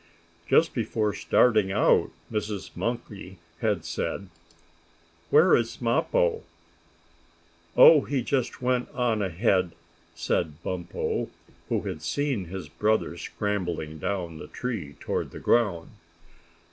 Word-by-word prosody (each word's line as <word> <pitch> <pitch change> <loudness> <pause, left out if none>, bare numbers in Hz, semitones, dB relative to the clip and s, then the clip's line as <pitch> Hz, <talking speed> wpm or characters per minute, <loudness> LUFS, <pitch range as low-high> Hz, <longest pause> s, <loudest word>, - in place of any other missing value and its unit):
Just - - +4
before 105 -2 -1
starting 105 -2 +3
out 105 - +3 0.2
Mrs. 105 -2 -4
Monkey 105 -6 -5 0.2
had 100 -7 0
said: 85 +3 -3 1.0
"Where 160 +5 +6
is 115 -1 -1
Mappo?" 455 - +1 1.4
"Oh, - - +9
he 135 -4 -2
just 130 -1 -1
went 125 0 +1
on 120 -4 +1
ahead," 95 -1 +1 0.4
said 80 0 -2
Bumpo, 90 -2 -3 0.4
who - - +1
had - - -5
seen 140 -9 -1
his 90 -1 -7
brother 105 +3 0
scrambling 85 -5 -3
down 85 -3 -3
the - - -8
tree 100 - -5
toward - - -2
the - - -9
ground. 100 -9 +1
105 Hz, 110 wpm, -26 LUFS, 90-120 Hz, 1.4 s, Oh